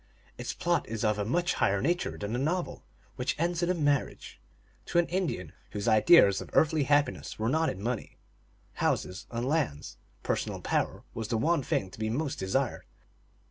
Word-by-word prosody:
Its -, -, -4 dB
plot 175 Hz, -7 st, 0 dB
is 115 Hz, 0 st, -3 dB
of 105 Hz, -1 st, +1 dB
a 100 Hz, -, 0 dB
much 175 Hz, +10 st, +1 dB
higher 95 Hz, 0 st, +2 dB
nature 175 Hz, -, 0 dB
than 105 Hz, +3 st, -3 dB
a -, -, -1 dB
novel, 170 Hz, +6 st, -2 dB, 0.3 s
which 125 Hz, 0 st, -1 dB
ends 170 Hz, +1 st, 0 dB
in 175 Hz, -, +1 dB
a 180 Hz, -, +2 dB
marriage. 145 Hz, -, -1 dB, 0.5 s
To -, -, -1 dB
an 175 Hz, -, +5 dB
Indian, 170 Hz, -, -2 dB, 0.2 s
whose 100 Hz, -1 st, -3 dB
ideas 110 Hz, -, +6 dB
of -, -, -9 dB
earthly 155 Hz, -2 st, +3 dB
happiness 145 Hz, +1 st, +1 dB
were 110 Hz, +1 st, 0 dB
not 160 Hz, +4 st, +2 dB
in 95 Hz, -, -5 dB
money, 120 Hz, -1 st, -3 dB, 0.6 s
houses, 90 Hz, +2 st, -1 dB
and 120 Hz, +1 st, -3 dB
lands, 100 Hz, -, -1 dB, 0.3 s
personal -, -, -2 dB
power -, -, -1 dB
was 110 Hz, -2 st, -4 dB
the 115 Hz, 0 st, 0 dB
one 160 Hz, +7 st, +2 dB
thing 95 Hz, -6 st, -1 dB
to -, -, -13 dB
be 110 Hz, 0 st, -1 dB
most 140 Hz, +5 st, -2 dB
desired. 120 Hz, +7 st, -1 dB
130 Hz, 180 wpm, -29 LUFS, 105-165 Hz, 0.6 s, ideas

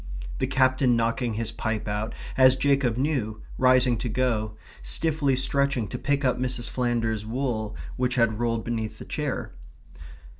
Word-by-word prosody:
the -, -, +1 dB
Captain 130 Hz, -1 st, +3 dB
knocking 115 Hz, 0 st, 0 dB
his 115 Hz, 0 st, -2 dB
pipe 110 Hz, -1 st, -3 dB
out, 105 Hz, +2 st, -2 dB, 0.2 s
as 130 Hz, -1 st, +6 dB
Jacob 135 Hz, -3 st, +2 dB
knew, 125 Hz, -6 st, -1 dB, 0.2 s
rising 130 Hz, -2 st, +4 dB
to 125 Hz, -, -2 dB
go, 110 Hz, -3 st, 0 dB, 0.2 s
stiffly 140 Hz, -, 0 dB
stretching 140 Hz, -2 st, +1 dB
to -, -, -5 dB
pick 145 Hz, -1 st, 0 dB
up 125 Hz, -, +2 dB
Mrs. 125 Hz, -2 st, -2 dB
Flanders's 115 Hz, -4 st, -1 dB
wool 110 Hz, -2 st, -2 dB, 0.2 s
which 125 Hz, 0 st, 0 dB
had 115 Hz, -3 st, +2 dB
rolled 115 Hz, -1 st, 0 dB
beneath 110 Hz, -2 st, -3 dB
the -, -, -9 dB
chair. -, -, -3 dB
120 Hz, 150 wpm, -26 LUFS, 110-130 Hz, 0.2 s, as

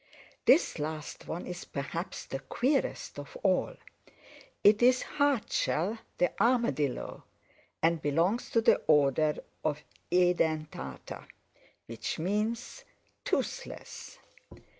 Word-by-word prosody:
This 275 Hz, -, +5 dB
last 155 Hz, 0 st, -5 dB
one 170 Hz, -, -4 dB
is 180 Hz, 0 st, -6 dB
perhaps 165 Hz, +6 st, -5 dB
the 135 Hz, -, -4 dB
queerest 255 Hz, -, -1 dB
of -, -, -9 dB
all. -, -, +2 dB, 0.9 s
It 210 Hz, +2 st, +6 dB
is 255 Hz, +1 st, +5 dB
Hardshell 230 Hz, -, 0 dB, 0.2 s
the 180 Hz, -, +2 dB
Armadillo, 235 Hz, -, +1 dB, 0.6 s
and 165 Hz, -1 st, +3 dB
belongs 170 Hz, -, +1 dB
to 230 Hz, -, +3 dB
the -, -, +4 dB
order 150 Hz, 0 st, +4 dB, 0.3 s
of 150 Hz, -1 st, -1 dB, 0.3 s
Edentata, 160 Hz, -, 0 dB, 0.6 s
which 115 Hz, -1 st, -4 dB
means 210 Hz, +7 st, -2 dB, 0.4 s
toothless." -, -, -4 dB
175 Hz, 95 wpm, -30 LUFS, 150-230 Hz, 0.9 s, It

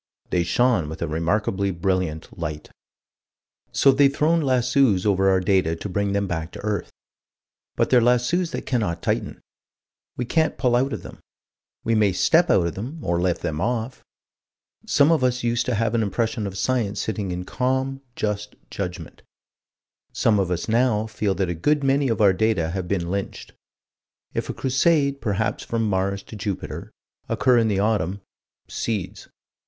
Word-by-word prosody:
"They 90 Hz, -, +2 dB
shone 110 Hz, -4 st, +2 dB
with 80 Hz, +1 st, -5 dB
a -, -, -1 dB
remarkably 95 Hz, +5 st, 0 dB
brilliant 90 Hz, -3 st, -2 dB
light." 75 Hz, -2 st, -5 dB, 1.0 s
So 135 Hz, -, +5 dB
they've 140 Hz, +1 st, +4 dB
thrown 160 Hz, +4 st, +2 dB
lassos 125 Hz, -6 st, +2 dB
over 95 Hz, -1 st, +3 dB
our 95 Hz, -1 st, +4 dB
data 90 Hz, -3 st, +1 dB
to 85 Hz, -, -6 dB
bring 100 Hz, +2 st, -1 dB
them 100 Hz, 0 st, +1 dB
back 85 Hz, -3 st, -4 dB
to -, -, -8 dB
earth. 105 Hz, -1 st, -2 dB, 0.8 s
But -, -, 0 dB
they're 125 Hz, -2 st, +6 dB
lassos 125 Hz, +9 st, +2 dB
that -, -, -5 dB
cannot 105 Hz, -10 st, -1 dB
tighten. -, -, -2 dB, 0.8 s
We 125 Hz, -, -2 dB
can't 160 Hz, +6 st, +1 dB
pull 125 Hz, -2 st, +2 dB
out 130 Hz, +3 st, +1 dB
of -, -, -5 dB
them: -, -, -11 dB, 0.6 s
we 115 Hz, -, +1 dB
may 105 Hz, -3 st, +3 dB
step 170 Hz, -, +3 dB
out 90 Hz, -, +4 dB
of 85 Hz, -, -2 dB
them, 125 Hz, +11 st, -6 dB
or 85 Hz, 0 st, 0 dB
lift 90 Hz, -2 st, 0 dB
them 75 Hz, +1 st, -2 dB
off. 120 Hz, +2 st, -2 dB, 0.8 s
Some 145 Hz, +3 st, +4 dB
of 160 Hz, -5 st, +2 dB
us 125 Hz, -1 st, +1 dB
used 120 Hz, 0 st, 0 dB
to -, -, +1 dB
have 115 Hz, +1 st, 0 dB
an 115 Hz, -, +2 dB
impression 110 Hz, +1 st, -1 dB
of 95 Hz, 0 st, -6 dB
Science 110 Hz, -4 st, 0 dB
sitting 105 Hz, -3 st, -3 dB
in 90 Hz, 0 st, -4 dB
calm, 130 Hz, +3 st, -1 dB
just 105 Hz, 0 st, -3 dB, 0.2 s
judgment: 90 Hz, -3 st, -6 dB, 0.9 s
some 105 Hz, -3 st, +2 dB
of 95 Hz, -2 st, 0 dB
us 90 Hz, -1 st, -2 dB
now 115 Hz, -1 st, +2 dB
feel 105 Hz, -3 st, -1 dB
that 95 Hz, -, 0 dB
a 85 Hz, -, -1 dB
good 145 Hz, -, +1 dB
many 135 Hz, 0 st, +2 dB
of 115 Hz, -, 0 dB
our 100 Hz, -2 st, +6 dB
data 95 Hz, -6 st, +1 dB
have 90 Hz, 0 st, -3 dB
been 85 Hz, -2 st, -1 dB
lynched. 100 Hz, 0 st, -4 dB, 0.8 s
If -, -, -3 dB
a -, -, -2 dB
Crusade, 140 Hz, +1 st, +2 dB
perhaps 105 Hz, 0 st, -1 dB
from 115 Hz, -1 st, -1 dB
Mars 100 Hz, 0 st, -1 dB
to -, -, -11 dB
Jupiter, 100 Hz, -2 st, -5 dB, 0.4 s
occur 125 Hz, -2 st, +3 dB
in 115 Hz, -, +2 dB
the 100 Hz, -3 st, 0 dB
autumn 100 Hz, -2 st, 0 dB, 0.5 s
"seeds." 105 Hz, -6 st, -4 dB
105 Hz, 170 wpm, -23 LUFS, 95-125 Hz, 1.0 s, they're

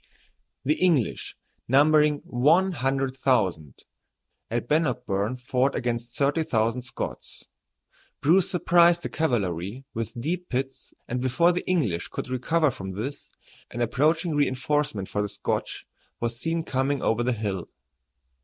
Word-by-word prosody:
The 150 Hz, +3 st, +1 dB
English, 165 Hz, -, +1 dB, 0.3 s
numbering 150 Hz, +2 st, +4 dB
one 160 Hz, +10 st, +3 dB
hundred 135 Hz, -3 st, -1 dB
thousand, 95 Hz, -, 0 dB, 0.7 s
at 115 Hz, +1 st, -2 dB
Bannockburn 125 Hz, -7 st, 0 dB
fought 125 Hz, +2 st, 0 dB
against 120 Hz, -1 st, -3 dB
thirty 145 Hz, +3 st, +2 dB
thousand 115 Hz, -3 st, 0 dB
Scots. 120 Hz, -, -7 dB, 0.7 s
Bruce 175 Hz, +5 st, +3 dB
surprised 175 Hz, -2 st, +4 dB
the -, -, -3 dB
cavalry 105 Hz, -, -1 dB
with 115 Hz, +1 st, -4 dB
deep 175 Hz, +7 st, -3 dB
pits, 135 Hz, +1 st, -4 dB
and 125 Hz, +1 st, -2 dB
before 130 Hz, +7 st, +3 dB
the 180 Hz, +1 st, -3 dB
English 115 Hz, -, 0 dB
could -, -, -6 dB
recover 150 Hz, +4 st, +1 dB
from 95 Hz, -5 st, -7 dB
this, 135 Hz, +9 st, -6 dB, 0.4 s
an 120 Hz, -, -7 dB
approaching 155 Hz, +8 st, +1 dB
reinforcement 140 Hz, -6 st, 0 dB
for 105 Hz, -, -2 dB
the 105 Hz, -, -2 dB
Scotch -, -, -3 dB, 0.3 s
was 115 Hz, 0 st, -1 dB
seen 165 Hz, +6 st, -2 dB
coming 135 Hz, -1 st, -1 dB
over 115 Hz, +1 st, +1 dB
the 125 Hz, +1 st, +1 dB
hill. 100 Hz, -5 st, -3 dB
130 Hz, 130 wpm, -26 LUFS, 115-155 Hz, 0.7 s, numbering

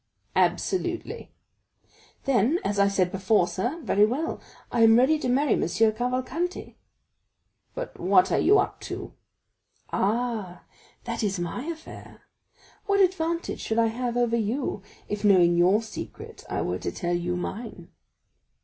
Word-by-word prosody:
"Absolutely." 370 Hz, +4 st, -1 dB, 0.9 s
"Then, 265 Hz, -, +2 dB
as 200 Hz, 0 st, 0 dB
I 200 Hz, -, +5 dB
said 185 Hz, -3 st, +1 dB
before, 195 Hz, -1 st, +2 dB
sir,—very 240 Hz, -, 0 dB
well; 290 Hz, +9 st, -3 dB, 0.3 s
I 235 Hz, -, +1 dB
am 225 Hz, 0 st, +7 dB
ready 285 Hz, +5 st, +4 dB
to 255 Hz, -, -2 dB
marry 275 Hz, +4 st, +3 dB
M. -, -, 0 dB
Cavalcanti." 250 Hz, -, -1 dB, 1.0 s
"But -, -, -6 dB
what 185 Hz, 0 st, +4 dB
are -, -, +2 dB
you 410 Hz, +3 st, +5 dB
up -, -, 0 dB
to?" -, -, -7 dB, 0.8 s
"Ah, 215 Hz, -3 st, -1 dB, 0.4 s
that -, -, -4 dB
is 200 Hz, -3 st, 0 dB
my 175 Hz, -, -4 dB
affair. 325 Hz, -1 st, -9 dB, 0.6 s
What 400 Hz, 0 st, +2 dB
advantage 340 Hz, -3 st, 0 dB
should 220 Hz, -, -2 dB
I 230 Hz, -1 st, +4 dB
have 245 Hz, 0 st, -2 dB
over 240 Hz, -1 st, +2 dB
you, 225 Hz, 0 st, -2 dB, 0.3 s
if 210 Hz, 0 st, -4 dB
knowing 180 Hz, -4 st, +5 dB
your 185 Hz, +6 st, +4 dB
secret 220 Hz, -, -9 dB
I -, -, -1 dB
were 90 Hz, +1 st, -2 dB
to -, -, -3 dB
tell 175 Hz, -, -2 dB
you 175 Hz, +1 st, -1 dB
mine?" 215 Hz, +5 st, -6 dB
230 Hz, 140 wpm, -26 LUFS, 195-285 Hz, 1.0 s, am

